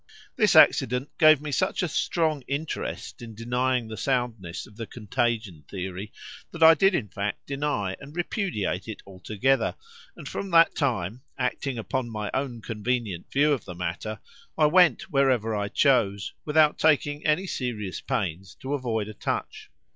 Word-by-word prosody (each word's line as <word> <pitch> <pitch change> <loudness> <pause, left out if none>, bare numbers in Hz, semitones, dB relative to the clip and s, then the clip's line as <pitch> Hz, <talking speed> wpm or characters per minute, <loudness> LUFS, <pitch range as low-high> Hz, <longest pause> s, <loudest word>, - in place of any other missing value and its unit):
This - - +3
accident 125 +4 +5
gave 155 -3 +7
me 150 -1 -5
such 140 - 0
a - - +1
strong 160 -2 0
interest 145 -2 -4
in 115 -2 -9
denying 125 +1 0
the 110 - -6
soundness 115 -9 -2
of 105 - -17
the 115 0 -6
contagion 115 - -2
theory, 95 +2 -5 0.4
that 165 -1 -2
I 160 0 +10
did 195 +4 +3
in 115 -10 -1
fact 100 +1 -4
deny 140 -9 -2
and 145 +3 -12
repudiate 175 - -2
it 110 - -7
altogether; 105 +8 0 0.4
and - - -9
from 200 - -4
that 165 -1 +6
time, 120 - -1 0.2
acting 130 0 -2
upon 120 +2 -3
my 105 -2 -4
own 125 -5 -3
convenient 110 -4 -3
view 145 +2 +3
of 135 - -3
the 90 - -8
matter, 90 +5 -4 0.4
I 155 - +5
went 165 -3 +4
wherever 130 -6 +2
I 100 0 -1
chose, 100 -6 +2
without 150 0 +3
taking 150 -1 +2
any 155 +5 +2
serious 110 - -4
pains 90 +1 -3
to 135 +2 -3
avoid 115 -6 -1
a 110 - -7
touch. - - -4
125 Hz, 160 wpm, -26 LUFS, 105-145 Hz, 0.4 s, I